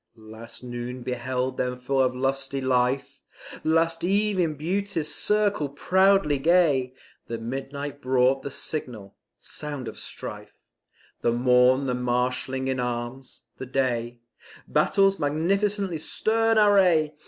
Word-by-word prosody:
Last 110 +2 -11
noon 120 0 -6
beheld 125 +1 -2
them 125 0 -2
full 135 +2 0
of 130 -1 +1
lusty 135 +1 -1
life, 130 0 0 0.4
Last 165 +1 +1
eve 200 +2 +1
in 165 -4 +1
Beauty's 165 -1 -2
circle 205 -8 +1
proudly 190 0 +3
gay, 145 -6 +3 0.3
The 115 - -4
midnight 135 +4 -5
brought 130 +1 +2
the - - -5
signal 125 -8 -6 0.2
sound 145 -5 -7
of - - -8
strife, - - -8 0.6
The 120 - +1
morn 125 +2 +4
the 125 - 0
marshalling 125 +2 -1
in 130 -1 -1
arms, 125 +2 -5
the 130 - -7
day 120 -2 -1 0.5
Battle's 195 -1 +2
magnificently 185 +4 0
stern 225 +7 +1
array! 185 -7 +4
135 Hz, 120 wpm, -25 LUFS, 125-165 Hz, 0.6 s, morn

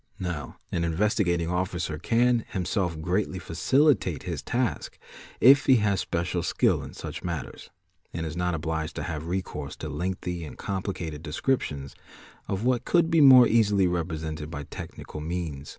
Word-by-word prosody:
Now 90 -6 -5
an 85 - 0
Investigating 85 -1 +1
Officer 90 -4 -2
can 120 +2 +2
himself 90 -3 -1
greatly 95 +4 -1
facilitat 115 - +2
his - - -4
task 125 -1 -2 0.4
if 140 +3 +7
he 130 - +7
has 105 -4 +2
special 85 +1 -1
skill - - +1
in - - -9
such - - -7
matters, 85 -6 -5 0.4
and 80 0 -4
is 80 0 -5
not 90 -1 0
obliged 80 0 -3
to - - -3
hay 80 -3 -3
recourse 80 -3 -4
to - - -6
lengthy 90 -1 -3
and 75 - -9
complicated 90 -6 -4
descriptions 75 - -2 0.5
of 95 +2 -2
what 125 -1 +2
could 170 +2 +2
be 165 -1 +5
mot 130 -3 +9
easily 105 -4 +3
represented 80 -3 -3
by 75 -3 -5
technical 75 - -8
means. 80 -4 -4
90 Hz, 150 wpm, -27 LUFS, 80-105 Hz, 0.5 s, mot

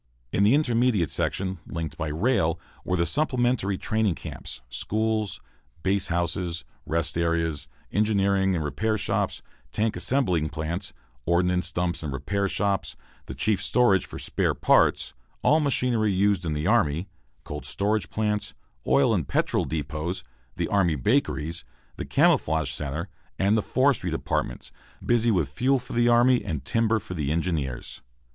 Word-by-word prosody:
In 100 - +2
the 110 +6 +5
intermediate 120 - +2
section, 95 -1 -2
linked 80 -2 -4
by 80 - -3
rail, 85 - +1 0.2
were 90 - -1
the 85 - +2
supplementary 125 - +1
training 110 -4 0
camps, 65 0 -6
schools, 110 - -1 0.4
base 95 0 +1
hospitals, 85 -1 -1 0.2
rest 85 0 -1
areas, 85 -3 0 0.2
engineering 100 -2 +2
and 80 - -1
repair 110 +10 -1
shops, - - -1 0.3
tank 110 0 0
assembling 90 - +1
plants, 80 +5 -3 0.4
ordnance 90 +1 +2
dumps 85 0 -1
and 75 -3 -4
repair 100 +10 -1
shops, 100 0 -1 0.3
the 65 - -6
chief 100 +9 +1
storage 110 -7 +3
for - - -8
"spare - - 0
parts," - - +3 0.3
all 155 - +5
machinery 125 -7 +2
used 95 -2 +2
in 80 - -1
the 75 +1 -2
army, 90 -5 +2 0.4
cold 75 -2 -6
storage 100 +8 -1
plants, 105 -1 -1 0.3
oil 65 +2 +4
and - - 0
petrol - - +1
depots, 80 +3 -3 0.3
the - - -1
army 90 -6 +2
bakeries, 80 - 0 0.3
the - - -4
camouflage 80 -3 +2
centre, 75 +5 -4 0.3
and 100 +3 +3
the 110 - +2
forestry 130 -6 +1
departments, 80 - -2 0.3
busy 120 -1 +3
with 90 -9 +2
fuel 130 - +1
for 125 - -8
the 120 0 +3
army 120 +1 +4
and 70 -4 -4
timber 115 +3 +2
for 90 - -8
the 75 -4 -2
engineers. 80 -7 -2
95 Hz, 145 wpm, -26 LUFS, 80-110 Hz, 0.4 s, the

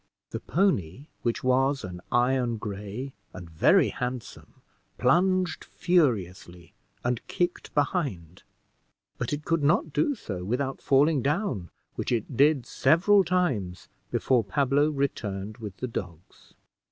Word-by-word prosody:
The - - -3
pony, 140 - 0 0.2
which 120 - -1
was 135 +2 +2
an 90 -1 -7
iron 125 -1 +2
gray 105 +5 -6 0.2
and 90 -2 -8
very 80 -1 +4
handsome, 125 -1 -6 0.4
plunged 180 +7 +2
furiously 95 - -1 0.3
and 120 -1 0
kicked 175 0 -2
behind, 135 - -1 0.8
but 120 - -2
it 150 +1 -3
could 165 -1 +1
not 155 +1 +2
do 210 - +1
so 95 - -6
without 130 +7 -2
falling 140 +1 +3
down, 145 - -1 0.3
which - - -2
it 120 +2 -1
did 140 0 +4
several 185 +8 +4
times 135 - -1 0.2
before 125 -3 +2
Pablo 140 +7 +2
returned 110 -8 -3
with 105 -4 -7
the 125 - -3
dogs. 90 -7 -8
130 Hz, 125 wpm, -27 LUFS, 100-150 Hz, 0.8 s, very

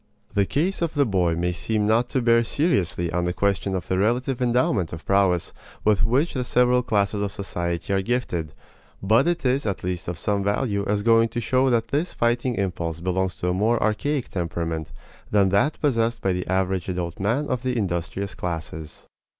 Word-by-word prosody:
The 100 -1 +2
case 175 +8 -1
of 165 -2 -1
the 145 -1 +3
boy 90 -6 +1
may 90 +1 0
seem 105 +4 -1
not 115 +3 +2
to 130 -4 0
bear 115 0 +4
seriously 95 - 0
on 90 0 0
the 90 - -1
question 100 +1 0
of 90 - -4
the 95 - 0
relative 120 +5 0
endowment 120 -7 +1
of 85 0 -8
prowess 95 -3 +2 0.3
with 105 -2 +3
which 135 +9 +2
the 130 - -1
several 125 0 +3
classes 105 -3 0
of 100 -1 -1
society 85 -2 -3
are 95 - +2
gifted; 95 - -2 0.5
but 110 - +4
it 175 -4 -1
is 130 0 +1
at 100 - -3
least 90 -1 -3
of 90 -1 -3
some 100 +2 0
value 100 0 0
as 100 0 0
going 115 0 +4
to 120 - -3
show 130 +3 +2
that 120 -2 +1
this 155 +5 -1
fighting 120 +1 0
impulse 85 -5 -2
belongs 90 0 -1
to 90 - -1
a - - +1
more 110 +5 +2
archaic 125 +6 0
temperament 85 -2 -3 0.4
than 100 -2 +3
that 100 +11 +1
possessed 120 -5 +1
by 95 - +2
the 90 0 -3
average 95 -1 0
adult 90 -2 -3
man 115 +9 0
of 125 -2 -1
the 125 -1 -1
industrious 95 0 -2
classes. 80 -3 -6
100 Hz, 195 wpm, -24 LUFS, 90-120 Hz, 0.5 s, bear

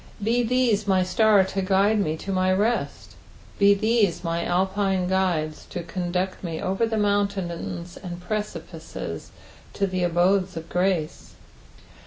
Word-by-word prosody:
Be 235 +3 +2
these 235 -4 +1
my 190 -2 +3
star 210 +1 +4
to 195 +1 -3
guide 200 +3 +3
mo 155 -6 0
to 195 +5 -6
my 185 0 +2
rest. 215 +5 -1 0.5
Be 200 0 +6
these 215 -4 +1
my 170 0 -1
Alpine 190 +1 0
guides 175 -5 -1
to 175 - -5
conduct 180 +2 -3
me 165 -3 -4
over 195 +5 0
mountains 190 -4 -1
and 175 -3 -6
precipices 210 +4 -5 0.4
to 200 - 0
the 185 -1 -2
abodes 180 +1 +2
of 165 0 -7
grace. 180 -4 -1
190 Hz, 135 wpm, -24 LUFS, 175-205 Hz, 0.5 s, Be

